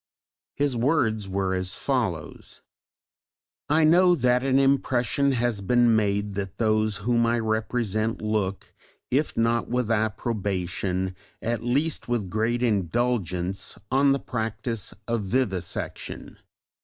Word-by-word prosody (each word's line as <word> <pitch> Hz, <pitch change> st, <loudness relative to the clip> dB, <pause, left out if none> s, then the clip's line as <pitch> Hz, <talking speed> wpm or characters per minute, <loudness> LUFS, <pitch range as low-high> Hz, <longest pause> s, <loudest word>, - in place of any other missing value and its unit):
His 145 Hz, -3 st, 0 dB
words 115 Hz, -6 st, +1 dB
were 95 Hz, 0 st, 0 dB
as 95 Hz, 0 st, -2 dB
follows: -, -, -3 dB, 1.1 s
I 155 Hz, +2 st, +4 dB
know 175 Hz, +3 st, +6 dB
that 125 Hz, -3 st, +2 dB
an 135 Hz, -1 st, +2 dB
impression 135 Hz, 0 st, +2 dB
has 120 Hz, -4 st, 0 dB
been 120 Hz, +3 st, +4 dB
made 100 Hz, -1 st, 0 dB
that 95 Hz, -1 st, -5 dB
those 110 Hz, -2 st, +1 dB
whom 115 Hz, -1 st, +3 dB
I 120 Hz, +1 st, +2 dB
represent 110 Hz, 0 st, -1 dB
look, 105 Hz, -3 st, -2 dB, 0.4 s
if 145 Hz, +4 st, 0 dB
not 115 Hz, +1 st, +1 dB
with 125 Hz, -1 st, 0 dB
approbation, 95 Hz, -4 st, -1 dB, 0.2 s
at 115 Hz, -1 st, -2 dB
least 140 Hz, +6 st, 0 dB
with 115 Hz, -7 st, -2 dB
great 115 Hz, +3 st, 0 dB
indulgence, 95 Hz, -3 st, 0 dB
on 135 Hz, +1 st, +4 dB
the 135 Hz, -, +2 dB
practice 110 Hz, -2 st, -3 dB, 0.2 s
of 115 Hz, -1 st, 0 dB
vivisection. 95 Hz, -4 st, -3 dB
115 Hz, 120 wpm, -25 LUFS, 100-125 Hz, 1.1 s, know